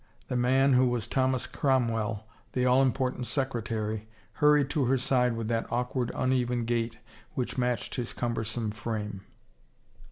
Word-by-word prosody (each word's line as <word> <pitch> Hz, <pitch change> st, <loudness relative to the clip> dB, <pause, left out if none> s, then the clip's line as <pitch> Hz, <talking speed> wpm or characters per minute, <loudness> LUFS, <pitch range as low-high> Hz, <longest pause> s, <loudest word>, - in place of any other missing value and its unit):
The -, -, -1 dB
man, 130 Hz, +3 st, +4 dB
who 125 Hz, 0 st, +5 dB
was 120 Hz, -3 st, -1 dB
Thomas 130 Hz, -1 st, +1 dB
Cromwell, 115 Hz, -5 st, 0 dB, 0.3 s
the 125 Hz, -1 st, +1 dB
all 125 Hz, +1 st, +5 dB
important 130 Hz, -1 st, 0 dB
secretary, 110 Hz, -5 st, -2 dB, 0.3 s
hurried 150 Hz, -2 st, +4 dB
to 145 Hz, -5 st, +1 dB
her 130 Hz, +2 st, +3 dB
side 125 Hz, -1 st, +2 dB
with 115 Hz, -1 st, -3 dB
that 115 Hz, -1 st, -1 dB
awk 125 Hz, +1 st, -1 dB
ward, 125 Hz, -3 st, 0 dB
uneven 125 Hz, -2 st, +1 dB
gait 115 Hz, -1 st, -1 dB, 0.4 s
which 125 Hz, -, -2 dB
matched 125 Hz, -1 st, -1 dB
his 125 Hz, -2 st, -3 dB
cumbersome 115 Hz, -2 st, -2 dB
frame. 105 Hz, -2 st, -4 dB
125 Hz, 150 wpm, -29 LUFS, 115-130 Hz, 0.4 s, who